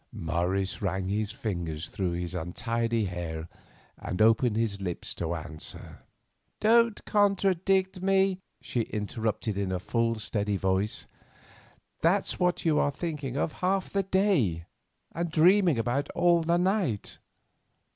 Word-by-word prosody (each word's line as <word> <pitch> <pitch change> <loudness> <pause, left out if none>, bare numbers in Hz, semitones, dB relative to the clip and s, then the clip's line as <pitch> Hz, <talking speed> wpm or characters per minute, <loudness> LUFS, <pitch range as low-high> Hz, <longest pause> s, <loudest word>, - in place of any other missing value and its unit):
Morris 90 +5 -1
ran 95 -1 -1
his 105 +1 -1
fingers 85 -7 -4
through 90 -3 -2
his 90 +1 -4
untidy 115 +6 -1
hair 85 -3 -4 0.5
and 90 - -4
opened 115 +1 +4
his 110 -3 -1
lips 90 -3 -3
to 85 0 -3
answer. 80 -1 -8 0.6
"Don't 230 0 +3
contradict 190 -2 +2
me," 195 0 +2 0.2
she 120 - -2
interrupted 110 -1 -2
in 95 -2 -1
a 95 - 0
full 115 +5 0
steady 105 -2 -1
voice. 95 +3 0 1.0
"That's 185 +5 +2
what 180 -1 +1
you 155 -2 +3
are - - +3
thinking 145 -3 -4
of 155 - 0
half 190 +1 0
the 200 - +1
day, 185 - +1 0.5
and 170 +1 -2
dreaming 175 - +4
about 120 +5 -1
all 175 -1 +4
the 170 +1 +2
night." 180 - 0
115 Hz, 130 wpm, -28 LUFS, -, 1.0 s, opened